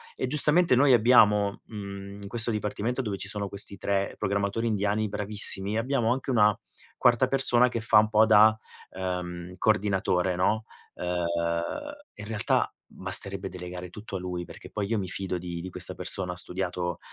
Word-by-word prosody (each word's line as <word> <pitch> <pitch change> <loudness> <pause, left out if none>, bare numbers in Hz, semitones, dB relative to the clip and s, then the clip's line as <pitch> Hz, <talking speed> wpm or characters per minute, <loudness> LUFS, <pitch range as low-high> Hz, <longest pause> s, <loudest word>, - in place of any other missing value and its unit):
E - - -2
giustamente 150 +2 +3
noi 135 +1 +5
abbiamo, 105 -4 +4
mhmm, 100 -2 -8
in 100 - -8
questo 115 +2 +2
dipartimento 105 +4 -2
dove 105 -5 -4
ci 100 - -6
sono 100 0 -3
questi 100 0 -4
3 100 +1 -1
programmatori 100 +3 -1
indiani 105 0 0
bravissimi, 100 0 +2
abbiamo 120 -1 0
anche 130 +1 -4
una 105 -3 +3 0.4
quarta 125 +1 +3
persona 125 -2 +5
che 120 -2 -3
fa 110 0 +4
un 105 0 +2
po' 110 0 +4
da, 110 0 +6 0.4
ehm, 90 -1 -5
coordinatore, 95 -3 +1
no? 110 +4 +1 0.3
Ehm, 90 0 -3 1.0
e - - -11
in 105 - -8
realtà 110 -2 0 0.2
basterebbe 95 +1 -1
delegare 90 0 -8
tutto 105 +2 -9
a - - -2
lui 90 -1 -5
perché - - -12
poi, 105 -2 -3
io 115 +2 0
mi 95 -3 -3
fido 95 -1 -3
di 85 -1 -6
di 90 +2 -6
questa - - -2
persona, 90 -2 -1
ha - - -6
studiato, 90 -1 -3
100 Hz, 170 wpm, -27 LUFS, 95-110 Hz, 1.0 s, da